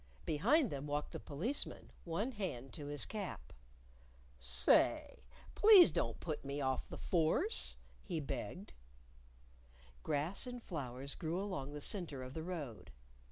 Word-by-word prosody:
Behind 240 - +3
them 140 +1 -4
walked 145 +1 -2
the - - -5
Policeman, 210 - -4
one 195 +9 -1
hand 175 - -5
to 145 -2 -7
his 145 -1 -1
cap. 205 -4 -6 0.9
"Say, - - +3 0.3
please 410 -4 +8
don't - - -1
put 155 -3 -4
me 140 +1 -4
off 130 -2 -1
the - - -7
Force," 180 - +2 0.3
he 175 -5 -3
begged. 150 +7 -5 1.3
Grass 155 - 0
and 245 0 -5
flowers 135 -4 -5
grew 165 +3 -3
along 145 -9 -4
the 150 - -6
center 155 -8 -1
of 130 +1 -8
the 160 - -4
road. 145 - -6
155 Hz, 135 wpm, -36 LUFS, 140-195 Hz, 1.3 s, please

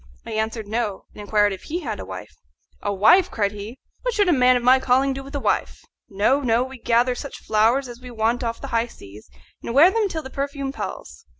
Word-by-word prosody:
I 230 - -7
answered, 220 0 -2
No, 215 -2 -3
and - - -10
inquired 205 -1 +2
if 190 - -10
he 345 +4 -3
had 220 - -4
a - - -6
wife. 95 -1 -9 0.5
"A 205 - -1
wife!" 220 - +5
cried 205 -2 0
he; 210 +4 -8 0.2
"what - - -2
should 410 -3 +3
a - - +5
man 255 -2 +5
of 245 - -4
my 255 +2 +6
calling 265 +1 +2
do 270 - -6
with 275 +2 -9
a - - 0
wife? - - -1 0.2
No, 210 +8 +2
no! 240 -2 +2
we 260 0 -9
gather 240 +2 +2
such 280 +3 -7
flowers 225 +5 +2
as 240 0 -10
we 250 - -9
want 230 +1 0
off 230 -1 -3
the 275 - -7
high 230 +1 +2
seas, 105 - -14 0.3
and 235 - -5
wear 330 +7 +7
them 430 -1 +1
till 320 -3 -4
the 265 - -9
perfume 275 0 -3
palls. - - -7
245 Hz, 235 wpm, -22 LUFS, 220-275 Hz, 0.5 s, wear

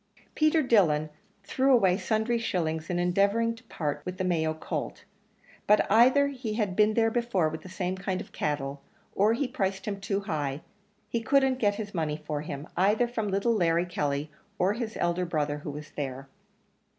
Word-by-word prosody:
Peter 310 0 +3
Dillon 155 - +3 0.3
threw 265 +6 +1
away 195 -8 +5
sundry 220 +3 0
shillings 160 -7 -2
in 175 - 0
endeavouring 200 +6 +2
to 225 - -14
part 150 -8 -3
with 180 0 -6
the 185 - -1
Mayo 165 -3 +1
colt, 160 - -5 0.6
but 210 - +5
either 260 +6 +5
he 250 -6 -4
had 205 -5 -1
been 215 +1 +3
there 225 -1 +3
before 225 -9 +1
with 160 +1 -7
the 185 - -11
same 180 0 -2
kind 190 -1 -3
of - - -9
cattle, 140 -2 -3 0.3
or 210 +3 +3
he 265 +3 -1
priced 195 -4 -2
him 200 -2 -4
too 195 0 -1
high; 145 -6 -3 0.5
he 235 - -2
couldn't 265 +1 +2
get 205 -3 +2
his 205 -1 -6
money 155 -4 -1
for 150 -1 -4
him, 145 0 -6
either 210 +7 +3
from 225 -3 -3
little 200 +4 +1
Larry 170 -4 +2
Kelly, 145 -3 -2 0.3
or 190 +3 +2
his 225 -1 -4
elder 175 +1 +1
brother 150 -4 -1
who 150 - -7
was 150 +1 -8
there. 135 -1 -5
190 Hz, 185 wpm, -28 LUFS, 155-225 Hz, 0.6 s, away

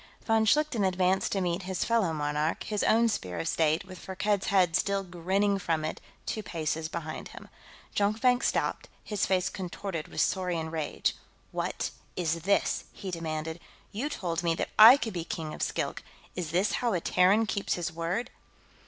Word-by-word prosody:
Von 225 -1 +3
Schlichten 295 -2 +2
advanced 185 0 +2
to 195 - 0
meet 175 +1 0
his 185 -1 -2
fellow 230 -7 +2
monarch, 150 +1 -1
his 210 -2 -2
own 230 +1 +4
Spear 90 - -3
of 80 - -2
State, 160 +2 +1
with 185 -1 -10
Firkked's 195 +1 -1
head 180 -4 +3
still 200 +2 +1
grinning 190 +3 0
from 160 -4 -1
it, 155 - -4 0.2
two 215 - -2
paces 160 -3 -3
behind 160 -1 -5
him. - - -12 0.5
Jonkvank 225 +5 +3
stopped, - - 0
his 210 -2 -1
face 185 -1 +2
contorted 185 -3 -5
with - - -6
saurian 175 -4 0
rage. 160 -2 -1 0.4
"What - - -2 0.2
is 165 -2 -1
this?" 200 +4 +1
he 190 - -7
demanded. 160 -1 -4 0.3
"You 240 +8 -2
told 175 - -2
me 170 -1 +1
that - - -3
I 230 +5 +11
could 225 -6 -4
be 170 -2 -3
King 160 -2 -5
of - - -8
Skilk; - - -2 0.3
is 175 -4 -3
this 180 +6 +2
how 240 -3 +1
a 180 - +1
Terran 185 +6 +4
keeps 200 -1 -1
his 175 0 -3
word?" 170 +8 -2
180 Hz, 175 wpm, -29 LUFS, 165-205 Hz, 0.5 s, I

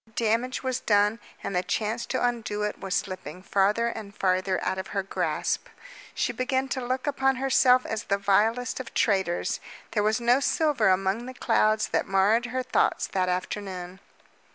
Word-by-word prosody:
The 220 - -25
damage 230 +4 0
was 260 -1 -1
done, 210 +1 +2 0.2
and 195 - -3
the 180 - +3
chance 215 +4 -2
to 255 - 0
undo 225 -4 -2
it 210 - -3
was 195 0 -3
slipping 185 -2 -4
farther 205 +4 +2
and 210 -3 -6
farther 185 0 +1
out 190 - -1
of 190 - -5
her 195 - +1
grasp. 195 - -2 0.5
She - - 0
began 260 +1 0
to 260 -2 -2
look 255 +1 -2
upon 270 -2 +1
herself 255 -1 +4
as 220 -1 -4
the 200 - +1
vilest 220 +6 +1
of 260 - -8
traitors. 190 -5 +1 0.3
There 210 - +1
was 215 +2 +2
no 240 +2 +4
silver 280 -6 +2
among 195 +5 +1
the 255 - -8
clouds 215 -2 +2
that - - 0
marred 205 +5 +3
her 255 +1 -2
thoughts 255 - +1
that 185 -1 0
afternoon. 185 0 -4
215 Hz, 175 wpm, -26 LUFS, 195-250 Hz, 0.5 s, herself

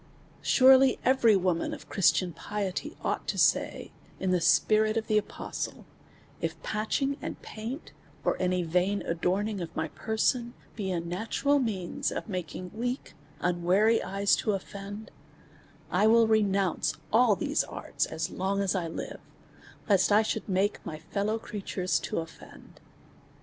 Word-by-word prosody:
Surely 265 0 +6
every 245 -4 +5
woman 180 -3 0
of - - -14
Christian 185 -3 +2
piety 205 - -4
ought - - -2
to - - -2
say, - - +1 0.3
in 190 - 0
the 180 -2 +2
spirit 215 +4 +3
of 225 - -1
the 215 -1 +3
apostle, 210 - -6 0.6
if - - -3
patching 270 +6 -1
and - - -5
paint, 230 +8 -7 0.3
or - - +2
any 180 -1 +1
vain 180 +4 +1
adorning 190 +4 -1
of 170 - -6
my 160 0 -2
person, 235 - -1 0.2
be 200 -4 -3
a 180 -2 0
natural 220 +12 0
means 200 -8 -2
of - - -4
making 180 -2 -5
weak, 245 +4 -3 0.3
unwary 180 +6 +3
eyes 200 +1 +2
to - - -2
ofi'end, 200 +2 -6 0.8
I 200 +4 +4
will 230 +1 +6
re 220 0 +4
nounce 195 -3 0 0.2
all 225 -2 +5
these - - 0
arts - - -3
as 160 +1 -3
long 195 +2 -1
as 195 -2 +1
I 180 -4 -1
live, 165 - -6 0.7
lest 195 -4 +4
1 210 +1 +5
should 220 0 -3
make 195 +2 0
my 155 - -6
fellow 205 +6 -2
creatures 195 -4 -2
to - - -4
offend. 165 0 -9
200 Hz, 150 wpm, -28 LUFS, 180-220 Hz, 0.8 s, Surely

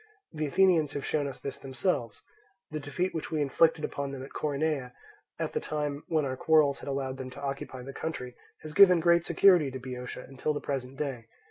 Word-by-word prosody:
The 155 -1 -2
Athenians 165 -2 +3
have 140 - -4
shown 145 -2 0
us 135 - -7
this 140 - -6
themselves; 130 -2 -2 0.5
the 155 - -3
defeat 165 +6 -2
which 160 - -4
we 155 - -1
inflicted 150 +2 +3
upon 140 -1 -4
them 135 -1 -6
at 135 - -11
Coronea, 145 -3 -1 0.4
at - - -3
the - - 0
time 150 -1 -3
when 155 -3 +1
our 130 -1 -2
quarrels 150 -1 +3
had - - -7
allowed 135 -1 -2
them 130 -1 -6
to 130 - -11
occupy 135 -2 -4
the 135 +2 -8
country, 125 -6 -5 0.3
has 155 -1 -7
given 180 -1 +8
great 170 0 +4
security 175 -3 +5
to 130 - -6
Boeotia 125 -1 -7
until 135 +3 -2
the - - -1
present 135 -1 -4
day. 135 -6 -3
145 Hz, 205 wpm, -29 LUFS, 135-155 Hz, 0.5 s, given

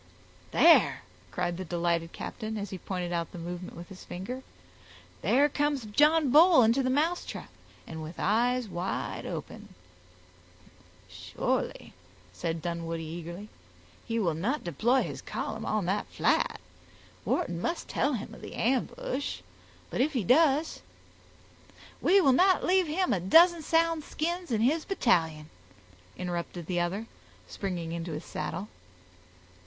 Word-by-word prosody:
"There," 240 - +5 0.3
cried 175 -1 -2
the 185 - -4
delighted 170 -1 -1
captain, 220 -1 -5
as 200 -2 -5
he 190 - -6
pointed 180 -2 -4
out 170 -1 -2
the - - -9
movement 175 +1 -7
with 175 +3 -9
his 190 -2 -11
finger, 220 +9 -6 0.8
"there 285 +3 +4
comes 290 -3 -1
John 295 +6 +3
Bull 320 -2 +7
into 230 +5 +3
the 255 - 0
mousetrap, 315 +7 -1 0.3
and 160 -1 -7
with 155 +2 -7
eyes 240 +4 +1
wide 180 -1 -4
open." - - -7 1.3
"Surely," - - -3 0.4
said 165 - -3
Dunwoodie 165 -1 -3
eagerly, 170 +5 -7 0.5
"he 230 -1 -3
will 180 -8 +1
not 220 - -2
deploy 235 - +2
his - - -6
column - - -5
on 215 -3 0
that 195 +4 -1
flat. - - +1 0.6
Wharton 170 - -1
must 335 - -2
tell 285 +2 0
him 225 -1 -5
of - - -12
the - - -8
ambush. 260 +2 -1 0.5
But - - 0
if 300 +4 +1
he 245 -6 0
does—" 295 - +3 1.2
"We 390 +3 +5
will 275 -6 +5
not 370 +6 +4
leave 370 -1 +3
him 360 +4 +1
a 195 - +1
dozen 330 - +6
sound 330 0 +2
skins 345 +3 -3
in 220 -3 0
his 305 +7 +2
battalion," 160 - +1 0.7
interrupted 175 -1 -4
the 175 +1 -1
other, 185 +6 -2 0.4
springing 170 - -4
into 170 -1 -4
his 150 - -6
saddle. 200 +3 -4
215 Hz, 140 wpm, -29 LUFS, 175-290 Hz, 1.3 s, Bull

